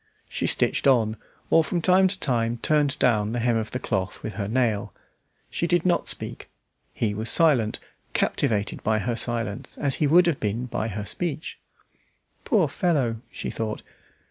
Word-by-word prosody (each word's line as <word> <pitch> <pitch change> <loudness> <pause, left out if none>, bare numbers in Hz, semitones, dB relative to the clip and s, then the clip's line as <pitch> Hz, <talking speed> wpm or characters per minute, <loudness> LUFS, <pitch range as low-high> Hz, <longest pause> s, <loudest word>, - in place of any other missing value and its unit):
She - - -2
stitched - - +1
on, 115 -5 +3 0.4
or 165 - +6
from 175 +2 -1
time 185 +3 +4
to 190 +1 -2
time 120 -3 0
turned 150 -2 +2
down 110 -5 +2
the 120 - -1
hem 120 0 +2
of 110 -1 -3
the - - -3
cloth 95 -5 -3
with 110 - -4
her 100 -2 -3
nail. 110 -4 0 0.6
She 170 - -1
did 175 0 +1
not 175 -1 +2
speak; - - -3 0.4
he 105 -3 -1
was 110 +2 0
silent, 135 -10 +3 0.3
captivated 105 -2 0
by 110 0 +1
her 115 +2 -1
silence, 115 -3 -2
as 140 -3 -1
he 150 - +4
would 175 +5 +6
have 170 -5 +1
been 110 +4 -2
by 115 -2 -3
her 105 -1 -4
speech. 160 - -4 0.9
"Poor 195 -8 +3
fellow!" 140 -7 0
she - - -5
thought. 110 -2 -4
120 Hz, 170 wpm, -25 LUFS, 110-155 Hz, 0.9 s, or